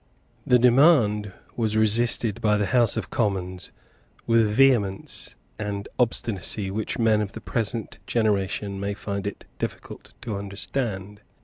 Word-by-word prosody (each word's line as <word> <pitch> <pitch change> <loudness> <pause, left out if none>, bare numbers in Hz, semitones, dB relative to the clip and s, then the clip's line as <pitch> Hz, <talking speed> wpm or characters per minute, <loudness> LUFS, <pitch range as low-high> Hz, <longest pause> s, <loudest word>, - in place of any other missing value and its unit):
The 125 - +6
demand 120 - +4 0.2
was 110 -2 0
resisted 110 0 +2
by 105 -1 +3
the 105 - +1
House 120 0 +2
of 95 -4 -4
Commons 95 -5 -2 0.5
with 115 -1 +4
a - - -2
vehemence 105 -5 +1 0.2
and 100 -1 -4
obstinacy 105 -4 0
which 105 +1 -3
men 110 -2 +3
of 100 -2 -4
the - - -7
present 115 -1 -3
generation 100 -2 0
may 100 +1 -3
find 100 -1 -4
it 100 - -7
difficult - - -7
to 110 -3 -4
understand. 100 0 -4
105 Hz, 135 wpm, -25 LUFS, 100-115 Hz, 0.5 s, The